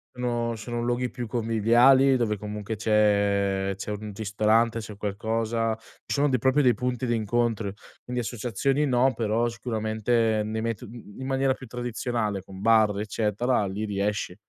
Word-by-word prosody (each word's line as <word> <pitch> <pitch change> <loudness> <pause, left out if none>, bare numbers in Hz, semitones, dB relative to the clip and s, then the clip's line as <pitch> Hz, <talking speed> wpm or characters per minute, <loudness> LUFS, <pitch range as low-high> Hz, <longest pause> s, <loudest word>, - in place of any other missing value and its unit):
sono 120 -1 -1
sono 120 +2 -4
luoghi 120 +1 0
più 125 -1 -5
conviviali 120 +4 +4
dove 105 -3 0
comunque 105 +1 -5
c'è 100 -2 +2
c'è 100 - -7
un 105 0 -5
ristorante, 110 +2 +1
c'è 110 -2 -6
qualcosa, 110 +2 -1
ci - - -9
sono 145 0 +2
dei 130 - +2
proprio 130 +5 +3
dei 125 -4 +4
punti 125 +2 -2
di 120 - +1
incontro. 110 -2 0 0.3
Quindi 125 0 -3
associazioni 125 +5 -1
no, 130 0 +2
però 115 +1 +1
sicuramente 110 -1 0
nei 110 +1 -3
meto 115 -2 -3
mhmm, 110 -1 -12
in - - -4
maniera 135 0 +1
più 135 - -11
tradizionale 115 -4 -3
con 95 0 -11
bar 110 -2 +4
eccetera, 110 +2 0
lì 100 +3 -4
riesci. 100 -2 -2
115 Hz, 155 wpm, -26 LUFS, 105-120 Hz, 0.3 s, conviviali